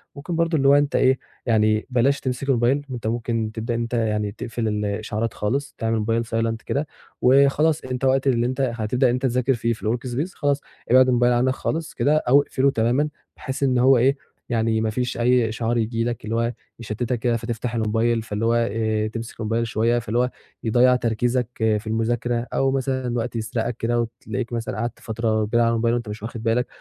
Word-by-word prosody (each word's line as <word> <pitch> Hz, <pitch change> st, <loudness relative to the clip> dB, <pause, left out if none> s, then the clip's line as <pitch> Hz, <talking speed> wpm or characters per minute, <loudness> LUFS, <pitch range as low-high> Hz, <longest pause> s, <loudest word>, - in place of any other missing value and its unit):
ممكن 155 Hz, +4 st, -5 dB
برضه 165 Hz, -1 st, +1 dB
اللي 135 Hz, -1 st, +2 dB
هو 140 Hz, -, +7 dB
أنت 145 Hz, 0 st, +2 dB
إيه، 130 Hz, 0 st, +3 dB, 0.3 s
يعني 110 Hz, -2 st, +2 dB
بلاش 130 Hz, +3 st, +2 dB
تمسك 130 Hz, +1 st, -3 dB
الموبايل، 125 Hz, +3 st, +2 dB
أنت 120 Hz, -3 st, -4 dB
ممكن 115 Hz, -1 st, -1 dB
تبدأ 115 Hz, +1 st, -3 dB, 0.3 s
يعني 105 Hz, -1 st, -1 dB
تقفل 115 Hz, +2 st, -4 dB
الاشعارات 105 Hz, +1 st, -2 dB
خالص 135 Hz, +7 st, -2 dB
تعمل 115 Hz, 0 st, -1 dB
الموبايل 115 Hz, +1 st, 0 dB
silent 115 Hz, 0 st, -1 dB
كده، 150 Hz, +2 st, -1 dB, 0.3 s
وخلاص 140 Hz, +4 st, +4 dB
أنت 130 Hz, 0 st, -3 dB
وقت 135 Hz, +1 st, +2 dB
اللي 120 Hz, -3 st, +2 dB
أنت 130 Hz, +2 st, -1 dB
هتبدأ 120 Hz, +4 st, +1 dB
إن -, -, +1 dB
أنت 125 Hz, -, -2 dB
تذاكر 125 Hz, +1 st, +2 dB
فيه 115 Hz, -1 st, 0 dB
في -, -, -11 dB
الwork 120 Hz, +2 st, -2 dB
space 155 Hz, +10 st, -2 dB
خلاص 145 Hz, -1 st, 0 dB, 0.3 s
ابعد 130 Hz, +1 st, +7 dB
الموبايل 120 Hz, -1 st, +3 dB
عنك 125 Hz, +2 st, +2 dB
خالص 160 Hz, +2 st, -3 dB
كده، 150 Hz, +2 st, +2 dB
أو 140 Hz, -1 st, +4 dB
اقفله 140 Hz, -1 st, +1 dB
تمامًا 125 Hz, +6 st, +1 dB, 0.3 s
بحيث 130 Hz, +2 st, -4 dB
إن 130 Hz, -2 st, +2 dB
هو 130 Hz, +1 st, +5 dB
إيه 135 Hz, +4 st, +3 dB, 0.3 s
يعني 110 Hz, -1 st, +1 dB
ما 110 Hz, -, 0 dB
فيش 125 Hz, +3 st, -2 dB
أي 120 Hz, -1 st, +3 dB
إشعار 115 Hz, +1 st, -1 dB
ييجي 115 Hz, 0 st, 0 dB
لك، 120 Hz, -2 st, -3 dB
اللي 110 Hz, +1 st, -2 dB
هو 115 Hz, +1 st, 0 dB, 0.3 s
يشتِّتك 120 Hz, +2 st, -3 dB
كده 120 Hz, 0 st, +1 dB
فتفتح 115 Hz, +1 st, -4 dB
الموبايل 115 Hz, +1 st, +1 dB
فاللي 110 Hz, 0 st, -3 dB
هو 115 Hz, -, +3 dB, 0.2 s
آآ، 110 Hz, 0 st, 0 dB
تمسك 115 Hz, +1 st, -7 dB
الموبايل 115 Hz, +1 st, -1 dB
شوية 115 Hz, +2 st, +1 dB
فاللي 115 Hz, +1 st, -1 dB
هو 125 Hz, 0 st, +2 dB, 0.3 s
يضيّع 125 Hz, +3 st, +4 dB
تركيزك 120 Hz, 0 st, 0 dB
في 110 Hz, -1 st, 0 dB
المذاكرة، 120 Hz, +2 st, -1 dB
أو 135 Hz, 0 st, +2 dB
مثلًا 130 Hz, -1 st, -1 dB
الوقت 120 Hz, 0 st, -2 dB
يسرقك 115 Hz, +1 st, -2 dB
كده 120 Hz, +1 st, 0 dB
وتلاقيك 115 Hz, +1 st, -5 dB
مثلًا 115 Hz, -3 st, -3 dB
قعدت 120 Hz, +2 st, -3 dB
فترة 110 Hz, -1 st, -1 dB
كبيرة 120 Hz, +3 st, +1 dB
على 115 Hz, -, +3 dB
الموبايل 115 Hz, 0 st, +1 dB
وأنت 120 Hz, -3 st, -4 dB
مش 105 Hz, 0 st, -7 dB
واخد 115 Hz, 0 st, -6 dB
بالك، 115 Hz, +2 st, +1 dB
120 Hz, 195 wpm, -23 LUFS, 115-130 Hz, 0.3 s, هو